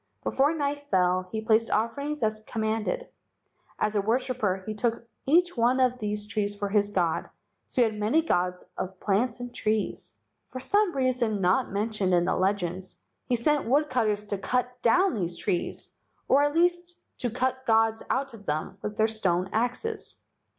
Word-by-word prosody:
Before 275 +3 +2
night 285 -1 -2
fell 185 -1 +2
he 220 - -2
placed 225 +1 +3
offerings 280 +6 -1
as 215 0 0
com¬ 225 - -4
manded. 225 - -1 0.7
As 215 - 0
a 205 - +3
worshipper 220 -3 0
he 215 - -3
took 230 +2 -2 0.2
each 350 +5 +4
one 245 +2 +3
of 250 -1 +2
these 210 -1 -2
trees 210 -1 -2
for 205 -1 -3
his 205 0 +2
god, 175 -5 0 0.4
so 250 - +2
he - - +4
had 215 -1 -3
many 230 +10 +2
gods 180 - 0
of 185 0 -5
plants 225 +4 0
and 245 0 -7
trees. 215 -2 -2 0.3
For 255 - -7
some 405 +5 +2
reason 250 -5 +1
not 190 +7 +2
mentioned 205 -2 0
in 175 0 +3
the - - +1
legends 185 -1 -1 0.3
he 250 - +2
sent 285 +2 +1
woodcutters 250 -7 +2
to 205 -1 -4
cut 250 +3 -1
down 365 +11 +4
these 175 -6 -2
trees, 175 - -2 0.3
or 275 - +5
at 290 +1 +1
least 350 +1 +1 0.2
to 245 - 0
cut 260 +2 -2
gods 225 0 +3
out 270 -1 -1
of 205 -3 -13
them 155 +6 -3
with 210 0 -5
their 220 - +4
stone 190 -4 0
axes. 250 - -2
225 Hz, 175 wpm, -27 LUFS, 205-260 Hz, 0.7 s, or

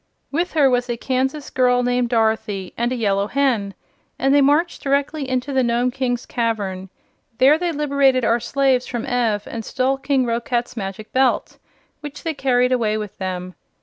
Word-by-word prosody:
With 340 +5 -1
her 295 -4 +4
was 245 -1 +1
a 240 - -2
Kansas 265 +4 -2
girl 250 -1 +2
named 245 -1 +1
Dorothy, 220 -4 0
and 240 +1 -1
a - - 0
Yellow 200 -4 0
Hen, 235 -7 0 0.4
and 270 +2 +2
they 285 - +5
marched 295 +5 +2
directly 280 0 -1
into 260 +2 -2
the 265 - +3
Nome 240 +1 +1
King's 245 -2 -2
cavern. 200 -6 -2 0.5
There 280 +6 +5
they 350 -1 -1
liberated 280 -4 +2
our 230 +2 +2
slaves 265 0 +1
from 240 -2 -4
Ev 230 -4 0
and 230 -1 -6
stole 260 +4 -1
King 270 -1 +1
Roquat's 240 +1 -2
Magic 205 0 -6
Belt, 260 -1 +1 0.4
which 295 -1 -9
they 325 - -1
carried 250 -3 +1
away 220 -4 +1
with 210 -2 -6
them. 185 -1 -4
250 Hz, 175 wpm, -21 LUFS, 230-275 Hz, 0.5 s, they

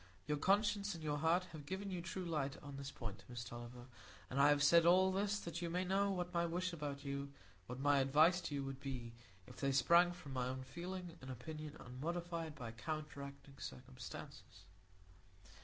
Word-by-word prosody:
Your 150 -1 0
conscience 205 +2 +3
and 165 - -8
your 150 -1 0
heart 165 +4 +3
have 150 -3 -9
given 195 +3 -3
you 180 -2 -2
true 185 +1 -4
light 150 -5 -1
on 140 -1 -7
this 140 0 -5
point, 105 -7 -6
Miss 120 -1 -4
Tulliver; 120 0 -8 0.5
and 135 +2 +3
I 145 - +8
have 145 -1 +4
said 170 +3 +7
all 185 +3 +6
this 200 +2 +1
that 170 0 -4
you 170 - -1
may 180 +2 0
know 195 +2 +3
what 180 -2 -2
my 170 0 +3
wish 180 +2 -1
about 145 -3 -4
you—what 125 -6 -6
my 145 0 +4
advice 155 +7 +5
to 145 - -2
you—would 135 -1 -3
be, 125 -4 -5 0.3
if 125 - -12
they 140 -1 +1
sprang 170 +6 +6
from 150 -6 -8
my 125 -1 0
own 130 0 -3
feeling 175 +4 -6
and 130 - -8
opinion 155 +4 -6
unmodified 165 +4 -3
by 120 -5 -5
counteracting 140 +1 -6
circumstances." 65 -1 -8
150 Hz, 185 wpm, -39 LUFS, 135-175 Hz, 0.5 s, I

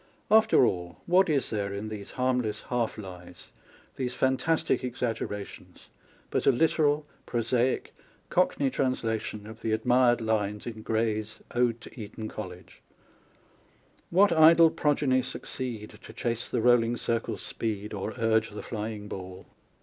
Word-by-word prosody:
After 220 - +6
all, 90 -4 -2
what 180 +1 +4
is 145 -4 0
there 100 -2 -1
in 100 +2 -4
these 105 -2 -7
harmless 125 -4 -1
half 120 -2 -1
lies, 90 -3 -10 0.5
these 125 -2 -2
fantastic 130 +6 +1
exaggera 115 -5 -3
tions, - - -15 0.4
but - - 0
a - - +8
literal, 150 +2 +2 0.2
prosaic, 120 +2 0 0.4
Cockney 145 -6 +2
translation 115 -5 -2
of 110 +1 -11
the 110 - 0
admired 120 +2 +3
lines 105 -2 -1
in 110 -2 -6
Gray's 110 -1 -1
Ode 120 -1 +1
to 115 - -10
Eton 110 +1 -6
College: 90 -4 -9 1.3
What 195 +3 +5
idle 165 0 +7
progeny 140 -3 +2
succeed 120 -3 -6
To - - -11
chase 115 -1 -2
the - - 0
rolling 120 -1 +4
circle's 115 -1 -2
speed 105 -1 -4
Or 105 +2 -4
urge 110 -1 +2
the 105 - -8
flying 105 -2 -5
ball 95 -2 -8
115 Hz, 135 wpm, -28 LUFS, 105-130 Hz, 1.3 s, a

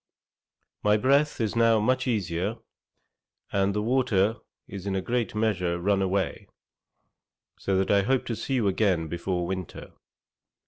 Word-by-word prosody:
'My 105 0 +3
breath 140 +6 +2
is 110 -1 -1
now 115 -1 +4
much 130 +4 +1
easier, 100 -1 -1 0.9
and 100 0 +1
the 105 - 0
water 115 -4 +2 0.3
is 100 0 -7
in 95 - -1
a - - +1
great 120 -1 -1
measure 95 -6 0
run 100 +2 +1
away, 95 0 -1 1.1
so 95 -1 0
that 95 - +1
I 100 -1 +5
hope 130 +5 +1
to 115 - -3
see 135 - -3
you 115 -5 +1
again 95 -4 +1
before 85 +2 -2
winter. 95 -1 -6
100 Hz, 145 wpm, -26 LUFS, 95-115 Hz, 1.1 s, I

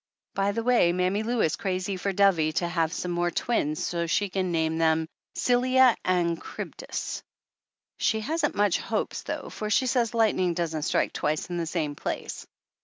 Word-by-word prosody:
By 195 +1 +1
the 230 +2 -2
way, 235 -8 +4
Mammy 185 +3 +1
Lou 235 +1 0
is 160 - +2
crazy 185 0 -2
for 195 +2 -2
Dovie 180 -5 +3
to 175 - 0
have 165 -2 0
some 180 0 -3
more 175 0 +1
twins 155 -7 -1
so 170 -1 -1
she 200 +4 +1
can 185 -1 -1
name 160 -1 0
them 160 0 +2 0.3
"Scylla 255 0 +4
and 170 -2 +1
Chrybdis." - - -5 0.8
She 220 -1 +1
hasn't 320 +9 -1
much 205 -3 +2
hopes - - -2
though, - - -5
for 215 - -4
she 235 +5 +3
says 235 -2 +1
lightning 185 -6 +2
doesn't 160 -2 -2
strike - - +1
twice 155 +4 -1
in 175 - -2
the 170 -1 -2
same 155 -3 -1
place. - - -5
180 Hz, 180 wpm, -27 LUFS, 165-215 Hz, 0.8 s, way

